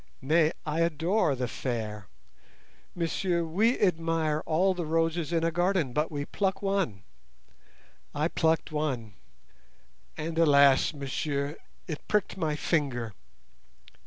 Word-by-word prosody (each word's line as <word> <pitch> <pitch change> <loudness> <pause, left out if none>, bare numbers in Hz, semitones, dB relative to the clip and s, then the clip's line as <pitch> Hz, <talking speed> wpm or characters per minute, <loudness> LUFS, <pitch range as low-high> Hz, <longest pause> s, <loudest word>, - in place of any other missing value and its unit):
Nay, 155 +3 +3
I 155 +1 -1
adore 165 0 +1
the 125 -1 -2
fair. 110 -5 -4 0.9
Messieurs, 170 0 0
we 215 +10 +2
admire 165 -4 +1
all 185 +4 +3
the 175 -3 -4
roses 165 0 0
in 165 -1 +1
a 165 - +2
garden, 175 -6 +1
but 150 +3 0
we 145 -1 -3
pluck 195 +3 -1
one. 190 - -1 1.1
I 150 +2 +1
plucked 160 -1 +1
one, 135 -9 -2 1.0
and 160 +1 -3
alas, 140 -4 +5
messieurs, 140 +1 -2 0.3
it 155 -3 -7
pricked 210 -2 0
my 160 -5 -1
finger. 135 -9 -1
160 Hz, 120 wpm, -28 LUFS, 140-170 Hz, 1.1 s, alas